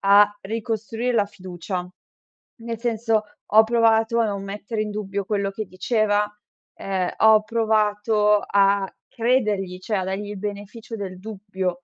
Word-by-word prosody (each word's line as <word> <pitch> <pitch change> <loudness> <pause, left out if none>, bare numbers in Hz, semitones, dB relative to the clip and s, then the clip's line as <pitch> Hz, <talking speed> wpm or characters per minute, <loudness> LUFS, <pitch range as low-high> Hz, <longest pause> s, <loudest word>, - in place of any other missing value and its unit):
a 205 +1 +5
ricostruir 225 +3 -3
la 205 -3 +3
fiducia. 180 -1 -6 0.7
Nel 230 -1 -6
senso, 225 -2 +1 0.3
ho 220 +1 +9
provato 225 0 +3
a 230 - +3
non 200 -2 -3
mettere 205 +2 -4
in 210 - -2
dubbio 200 -1 -3
quello 200 -1 -1
che 215 +2 -5
diceva, 210 +2 +1 0.5
ehm, 190 -2 -2
ho 220 -1 +6
provato 210 -1 +2
a 200 0 +3 0.2
credergli, 210 -7 0
cioè 210 +2 -2
a 185 - -1
dargli 200 +2 -3
il 205 - -6
beneficio 210 +3 -6
del 185 -3 -6
dubbio. 195 -3 -3
210 Hz, 140 wpm, -23 LUFS, 195-225 Hz, 0.7 s, ho